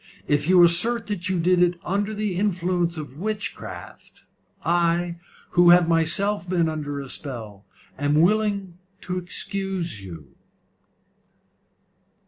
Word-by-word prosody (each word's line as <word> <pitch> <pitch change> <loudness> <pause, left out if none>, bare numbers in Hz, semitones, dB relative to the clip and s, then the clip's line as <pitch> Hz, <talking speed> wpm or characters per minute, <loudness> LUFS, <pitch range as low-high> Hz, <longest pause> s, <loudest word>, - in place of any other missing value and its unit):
If 145 +2 0
you 180 -1 +7
assert 225 +8 +4
that 195 -4 -3
you 185 -2 0
did 180 +1 +3
it 175 0 +2
under 200 +3 -1
the 210 -3 -2
influence 180 -3 0
of 145 -2 -8
witchcraft, 215 +2 -6 0.4
I, 170 0 +1 0.3
who 175 0 +5
have 175 -1 +6
myself 175 +4 +1
been 175 -3 +1
under 150 -2 -4
a 140 - -7
spell, 110 -8 -8 0.3
am 145 +1 +1
willing 200 -1 +1 0.2
to 180 0 -3
excuse 180 - -3
you." 80 -8 -11
175 Hz, 120 wpm, -23 LUFS, 160-195 Hz, 0.4 s, you